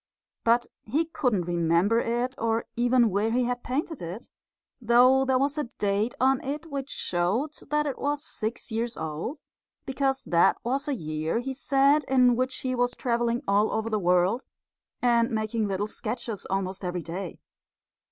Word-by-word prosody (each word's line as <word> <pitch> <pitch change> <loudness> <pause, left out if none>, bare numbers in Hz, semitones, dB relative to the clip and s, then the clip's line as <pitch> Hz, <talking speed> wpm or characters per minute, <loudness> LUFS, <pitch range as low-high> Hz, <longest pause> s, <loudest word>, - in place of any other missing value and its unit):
But 235 +1 +3 0.2
he 300 +9 0
couldn't 250 - 0
remember 175 +5 +2
it, 240 +2 -1
or 225 0 0
even 240 -1 +3
where 205 +4 +1
he 245 +2 +1
had 245 0 -2
painted 290 +4 -3
it, 175 +7 -7 0.5
though 250 +3 +5
there 260 -1 +3
was 285 +3 0
a 295 - -1
date 210 0 -1
on 265 +1 +3
it 290 +4 -4
which 275 -1 -4
showed 195 - -1 0.2
that 300 0 +1
it 280 - -3
was 290 +1 -1
six 225 -4 -4
years 230 +1 -2
old, 160 - -4 0.5
because 270 0 0
that 170 0 +3
was 270 +5 -1
a 285 - 0
year, 155 -2 -2
he 260 +3 -3
said, 275 +2 +3
in 250 -2 +4
which 255 +1 -1
he 255 -1 -1
was 245 0 0
travelling 235 -1 0
all 200 +2 +3
over 220 +1 -2
the 215 - +1
world 180 +6 +2 0.6
and 235 -1 +3
making 220 -1 -1
little 195 +1 -1
sketches 220 0 -5
almost 195 0 -2
every 180 -1 -3
day. 175 +2 -6
235 Hz, 165 wpm, -27 LUFS, 200-265 Hz, 0.6 s, though